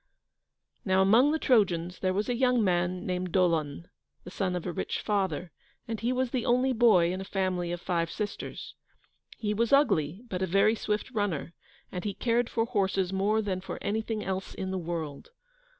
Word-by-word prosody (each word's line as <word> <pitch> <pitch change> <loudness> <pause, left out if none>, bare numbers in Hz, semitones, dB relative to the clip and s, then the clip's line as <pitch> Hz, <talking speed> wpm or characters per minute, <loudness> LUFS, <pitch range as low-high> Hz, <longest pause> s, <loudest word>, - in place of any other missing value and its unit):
Now 190 -1 +3
among 235 +9 +5
the 315 - +1
Trojans 180 - +2
there 185 - +1
was 200 +3 -1
a 245 - 0
young 250 -1 +2
man 180 -1 0
named 180 -1 -2
Dolon, 170 -4 +1 0.4
the 180 - -10
son 185 -1 -1
of 175 - -4
a 180 - -2
rich - - -3
father, 190 -5 -1 0.4
and 225 -2 -3
he 235 +4 0
was 255 -1 0
the 250 -3 -1
only 250 +2 +2
boy 205 -8 +4
in 185 - -4
a - - -4
family 185 -3 -1
of 175 - -3
five 170 -1 -1
sisters. 210 +2 -5 0.6
He 210 -2 -1
was 230 +2 0
ugly, 195 - +3
but 185 -4 -4
a 190 - +1
very 195 +4 +4
swift 210 +2 -2
runner, 205 - -2 0.4
and 180 - -5
he 205 -2 -3
cared 235 +1 +1
for 225 - 0
horses 195 -5 0
more 210 +3 +1
than 185 -2 -2
for 190 - -6
anything 220 +1 -2
else 190 0 -4
in 190 0 -4
the 190 - -2
world. 165 -4 -5
190 Hz, 190 wpm, -28 LUFS, 180-225 Hz, 0.6 s, among